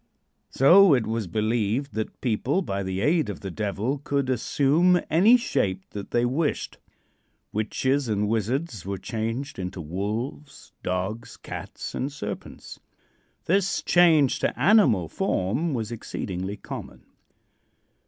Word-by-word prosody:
So, 175 Hz, +4 st, +6 dB
it 125 Hz, -, 0 dB
was 110 Hz, -2 st, -2 dB
believed 110 Hz, -, -1 dB
that 110 Hz, 0 st, -4 dB
people 130 Hz, -, 0 dB
by 100 Hz, -, -3 dB
the 95 Hz, 0 st, -3 dB
aid 155 Hz, 0 st, +2 dB
of 100 Hz, -, -6 dB
the 95 Hz, -, -5 dB
Devil 105 Hz, -, -2 dB
could 140 Hz, -2 st, 0 dB
assume 150 Hz, +8 st, +3 dB
any 200 Hz, +10 st, +6 dB
shape 95 Hz, -, -1 dB
that 100 Hz, -1 st, -7 dB
they 120 Hz, 0 st, +1 dB
wished. 145 Hz, +6 st, -1 dB, 0.7 s
Witches 130 Hz, +6 st, 0 dB
and 105 Hz, -1 st, 0 dB
wizards 115 Hz, -, -1 dB
were 100 Hz, +1 st, -4 dB
changed 115 Hz, +8 st, -4 dB
into 90 Hz, 0 st, -5 dB
wolves, 105 Hz, -, -5 dB
dogs, 95 Hz, +6 st, -3 dB
cats -, -, -7 dB
and 135 Hz, +3 st, -2 dB
serpents. 105 Hz, -8 st, -7 dB, 0.7 s
This 195 Hz, +2 st, +1 dB
change 160 Hz, -6 st, +4 dB
to -, -, -1 dB
animal 185 Hz, -, +4 dB
form 110 Hz, -, -1 dB
was 110 Hz, -2 st, -3 dB
exceedingly 100 Hz, -3 st, -5 dB
common. -, -, -9 dB
115 Hz, 125 wpm, -25 LUFS, 100-145 Hz, 0.7 s, So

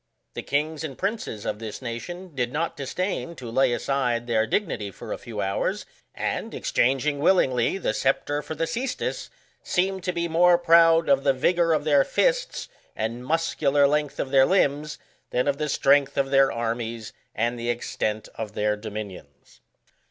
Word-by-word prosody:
The -, -, -5 dB
kings 150 Hz, +2 st, -1 dB
and 140 Hz, -5 st, -6 dB
princes 195 Hz, -, -3 dB
of 105 Hz, -, -3 dB
this 110 Hz, -2 st, -6 dB
nation 170 Hz, +9 st, -7 dB
did 125 Hz, -3 st, -1 dB
not 165 Hz, +3 st, -2 dB
disdain 170 Hz, +4 st, -3 dB
to 120 Hz, -6 st, -8 dB
lay 130 Hz, +1 st, +3 dB
aside 120 Hz, -2 st, 0 dB
their 110 Hz, -2 st, +1 dB
dignity 125 Hz, -, -1 dB
for 100 Hz, -, -7 dB
a -, -, -5 dB
few 110 Hz, -3 st, -6 dB
hours, 95 Hz, 0 st, -1 dB, 0.3 s
and -, -, -3 dB
exchanging 135 Hz, +3 st, +1 dB
willingly 140 Hz, -4 st, +3 dB
the 170 Hz, -, -1 dB
sceptre 145 Hz, +4 st, 0 dB
for 155 Hz, +2 st, -6 dB
the 165 Hz, -, -1 dB
ccestus, 250 Hz, +6 st, -3 dB, 0.3 s
seemed 190 Hz, 0 st, -1 dB
to 180 Hz, -, +1 dB
be 170 Hz, -1 st, -2 dB
more 175 Hz, +2 st, +5 dB
proud 165 Hz, -1 st, +5 dB
of 275 Hz, -, +3 dB
the 135 Hz, -, +4 dB
vigour 170 Hz, +5 st, +2 dB
of 155 Hz, -2 st, +2 dB
their 145 Hz, -2 st, +4 dB
fists -, -, 0 dB, 0.3 s
and 115 Hz, +3 st, -3 dB
muscular 145 Hz, -1 st, +2 dB
length 150 Hz, 0 st, 0 dB
of 130 Hz, -, -2 dB
their 135 Hz, -1 st, +5 dB
limbs 150 Hz, -5 st, +1 dB, 0.3 s
than 125 Hz, +3 st, 0 dB
of 140 Hz, 0 st, 0 dB
the 150 Hz, -1 st, -1 dB
strength 140 Hz, 0 st, +3 dB
of 135 Hz, -1 st, +1 dB
their 135 Hz, -1 st, +5 dB
armies 115 Hz, -1 st, -3 dB, 0.2 s
and 120 Hz, +2 st, -1 dB
the 120 Hz, +1 st, -3 dB
extent 110 Hz, -2 st, -2 dB
of 110 Hz, -2 st, -6 dB
their 105 Hz, 0 st, 0 dB
dominions. 105 Hz, -8 st, -9 dB
140 Hz, 170 wpm, -25 LUFS, 120-165 Hz, 0.3 s, more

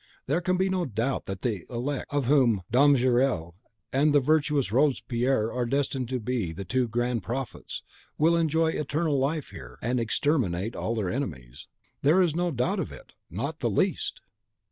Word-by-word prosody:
There 150 Hz, +7 st, 0 dB
can 185 Hz, +1 st, +1 dB
be 190 Hz, +1 st, +2 dB
no 185 Hz, -1 st, 0 dB
doubt 120 Hz, +1 st, -2 dB
that 95 Hz, -1 st, -5 dB
the 105 Hz, -8 st, -1 dB
elect, 130 Hz, +3 st, -3 dB
of 145 Hz, -2 st, 0 dB
whom 120 Hz, -8 st, +3 dB
Dom 140 Hz, +4 st, +6 dB
Gerle 125 Hz, -9 st, +1 dB, 0.4 s
and 145 Hz, +3 st, +3 dB
the -, -, +7 dB
virtuous 145 Hz, -3 st, +1 dB
Robespierre 125 Hz, -3 st, +1 dB
are 125 Hz, -1 st, -1 dB
destined 135 Hz, -1 st, -1 dB
to 130 Hz, -1 st, -1 dB
be 110 Hz, -6 st, -2 dB
the 95 Hz, +4 st, -7 dB
two 130 Hz, +4 st, +1 dB
grand 120 Hz, 0 st, -1 dB
prophets, 120 Hz, +5 st, -5 dB, 0.3 s
will 165 Hz, +3 st, +4 dB
enjoy 160 Hz, 0 st, +2 dB
eternal 150 Hz, -1 st, 0 dB
life 145 Hz, +2 st, -1 dB
here, 60 Hz, -1 st, -10 dB
and 125 Hz, +2 st, 0 dB
exterminate 115 Hz, -, 0 dB
all 115 Hz, -, -2 dB
their 100 Hz, -5 st, -1 dB
enemies. 70 Hz, -, -5 dB, 0.3 s
There 155 Hz, +7 st, +4 dB
is 175 Hz, -5 st, +3 dB
no 175 Hz, +1 st, +1 dB
doubt 165 Hz, -, 0 dB
of -, -, -3 dB
it, -, -, -13 dB, 0.2 s
not -, -, -4 dB
the -, -, 0 dB
least!" -, -, 0 dB
130 Hz, 175 wpm, -27 LUFS, 115-150 Hz, 0.4 s, the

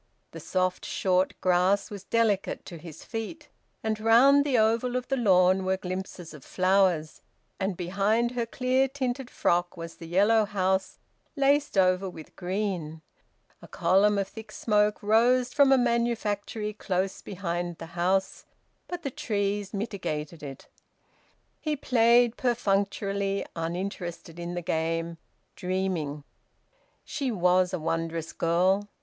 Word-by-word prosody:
The -, -, -8 dB
soft 185 Hz, -1 st, -1 dB
short 185 Hz, -1 st, 0 dB
grass 185 Hz, +3 st, +2 dB
was 200 Hz, -2 st, -8 dB
delicate 220 Hz, -4 st, 0 dB
to 170 Hz, -, -9 dB
his 165 Hz, -2 st, -11 dB
feet, 245 Hz, +7 st, -6 dB, 0.3 s
and 220 Hz, -1 st, -1 dB
round 250 Hz, +6 st, +6 dB
the 275 Hz, -4 st, +1 dB
oval 230 Hz, +3 st, +2 dB
of 250 Hz, -1 st, -2 dB
the 270 Hz, -, +2 dB
lawn 190 Hz, -5 st, +4 dB
were 190 Hz, 0 st, 0 dB
glimpses 185 Hz, -2 st, -6 dB
of 150 Hz, -4 st, -12 dB
flowers, 185 Hz, -4 st, +1 dB, 0.4 s
and 190 Hz, -2 st, -2 dB
behind 200 Hz, +6 st, +1 dB
her 240 Hz, -2 st, -2 dB
clear 255 Hz, +2 st, +1 dB
tinted 260 Hz, -1 st, -3 dB
frock 175 Hz, +1 st, 0 dB
was 165 Hz, 0 st, -8 dB
the 165 Hz, -, -9 dB
yellow 205 Hz, +5 st, +4 dB
house 190 Hz, -1 st, -1 dB, 0.4 s
laced 280 Hz, -3 st, +2 dB
over 185 Hz, 0 st, +3 dB
with 160 Hz, -3 st, -12 dB
green. 180 Hz, -4 st, -3 dB, 0.6 s
A -, -, -12 dB
column 200 Hz, +3 st, +3 dB
of 195 Hz, -1 st, 0 dB
thick 220 Hz, +1 st, -11 dB
smoke 210 Hz, -1 st, +1 dB
rose 245 Hz, +4 st, +3 dB
from 280 Hz, -2 st, +5 dB
a 270 Hz, -, +6 dB
manufactory 230 Hz, -3 st, -1 dB
close 190 Hz, -2 st, -2 dB
behind 175 Hz, -3 st, -4 dB
the -, -, -8 dB
house, 185 Hz, +2 st, 0 dB, 0.4 s
but 355 Hz, -1 st, -6 dB
the 275 Hz, -, -3 dB
trees 205 Hz, -7 st, -2 dB
mitigated 170 Hz, -7 st, -4 dB
it. 140 Hz, -2 st, -9 dB, 0.9 s
He 305 Hz, -1 st, -1 dB
played 240 Hz, -2 st, +3 dB
perfunctorily, 200 Hz, -4 st, 0 dB
uninterested 175 Hz, 0 st, -5 dB
in 175 Hz, +1 st, -5 dB
the 175 Hz, -, -4 dB
game, 165 Hz, +1 st, -2 dB, 0.4 s
dreaming. 180 Hz, -6 st, -2 dB, 0.8 s
She 280 Hz, -3 st, -3 dB
was 180 Hz, -3 st, +2 dB
a 185 Hz, -, -1 dB
wondrous 165 Hz, 0 st, -3 dB
girl! 185 Hz, +5 st, +1 dB
195 Hz, 135 wpm, -27 LUFS, 180-230 Hz, 0.9 s, round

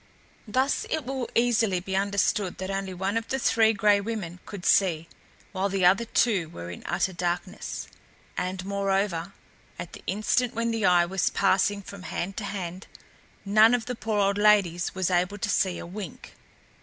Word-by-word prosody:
Thus 260 Hz, +6 st, 0 dB
it 315 Hz, -5 st, -2 dB
will 260 Hz, -1 st, -3 dB
easily 225 Hz, -5 st, +2 dB
be 190 Hz, +2 st, -4 dB
understood 200 Hz, -1 st, 0 dB
that 190 Hz, +1 st, -4 dB
only 195 Hz, -1 st, -3 dB
one 190 Hz, +4 st, -2 dB
of 230 Hz, -, -3 dB
the 265 Hz, -, -1 dB
Three 225 Hz, -3 st, +3 dB
Gray 205 Hz, -1 st, +3 dB
Women 195 Hz, -5 st, -5 dB
could 200 Hz, -3 st, -8 dB
see, 165 Hz, -4 st, +3 dB, 0.4 s
while 195 Hz, +1 st, -1 dB
the 190 Hz, -2 st, +1 dB
other 195 Hz, +6 st, +4 dB
two 210 Hz, -7 st, +1 dB
were 85 Hz, -, -8 dB
in 90 Hz, -, -9 dB
utter 190 Hz, -, 0 dB
darkness; 175 Hz, +3 st, -3 dB, 0.5 s
and, 185 Hz, +1 st, -3 dB
moreover, 195 Hz, -2 st, -1 dB, 0.4 s
at 175 Hz, -, -7 dB
the -, -, -10 dB
instant 215 Hz, +5 st, 0 dB
when 230 Hz, 0 st, 0 dB
the 225 Hz, -3 st, +1 dB
eye 175 Hz, -1 st, +5 dB
was 190 Hz, +1 st, 0 dB
passing 200 Hz, +1 st, +2 dB
from 200 Hz, 0 st, -10 dB
hand 185 Hz, +1 st, -4 dB
to 215 Hz, -, -3 dB
hand, 185 Hz, -2 st, -5 dB, 0.6 s
none 215 Hz, +4 st, +6 dB
of 235 Hz, -2 st, -3 dB
the 250 Hz, -, -3 dB
poor 220 Hz, -2 st, -2 dB
old 200 Hz, 0 st, +2 dB
ladies 195 Hz, -5 st, +3 dB
was 185 Hz, -1 st, 0 dB
able 180 Hz, +3 st, +1 dB
to -, -, -2 dB
see 185 Hz, -2 st, +1 dB
a -, -, -7 dB
wink. 185 Hz, -1 st, -8 dB
195 Hz, 180 wpm, -26 LUFS, 180-215 Hz, 0.6 s, none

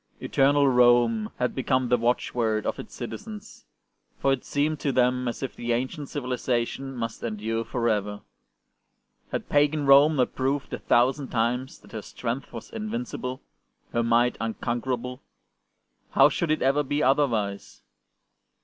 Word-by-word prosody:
'' -, -, -37 dB
Eternal 140 Hz, +1 st, +3 dB
Rome 120 Hz, -3 st, +4 dB
" -, -, -37 dB
had 125 Hz, -, 0 dB
become 130 Hz, -1 st, 0 dB
the 125 Hz, -, +5 dB
watchword 115 Hz, -2 st, 0 dB
of -, -, -2 dB
its -, -, -9 dB
citizens, 210 Hz, -, -8 dB, 0.5 s
for 135 Hz, -, +2 dB
it 130 Hz, -, -3 dB
seemed 150 Hz, +1 st, -1 dB
to 140 Hz, -, 0 dB
them 125 Hz, 0 st, +2 dB
as 120 Hz, -, -4 dB
if 135 Hz, -, -4 dB
the 120 Hz, 0 st, -1 dB
ancient 130 Hz, +5 st, -3 dB
civiliza 125 Hz, -3 st, -1 dB
tion 135 Hz, +2 st, -7 dB
must 115 Hz, -2 st, -4 dB
endure 115 Hz, 0 st, -2 dB
for 120 Hz, 0 st, -2 dB
ever. 105 Hz, -2 st, -1 dB, 1.1 s
Had -, -, -3 dB
pagan 145 Hz, 0 st, +2 dB
Rome 140 Hz, +3 st, +7 dB
not 125 Hz, -3 st, +1 dB
proved 135 Hz, +2 st, -1 dB
a -, -, -3 dB
thousand 130 Hz, +3 st, +2 dB
times 125 Hz, +3 st, -1 dB
that -, -, -18 dB
her 110 Hz, -, -5 dB
strength 125 Hz, +5 st, -5 dB
was 115 Hz, -2 st, -9 dB
invincible, 215 Hz, -, -4 dB, 0.5 s
her 120 Hz, -, +2 dB
might 120 Hz, +1 st, +2 dB
unconquerable? 120 Hz, +2 st, -3 dB, 0.9 s
How -, -, +6 dB
should 170 Hz, -, -2 dB
it 155 Hz, -, +1 dB
ever 135 Hz, +3 st, +3 dB
be 145 Hz, +1 st, -1 dB
otherwise 115 Hz, -8 st, 0 dB
125 Hz, 155 wpm, -26 LUFS, 115-140 Hz, 1.1 s, Rome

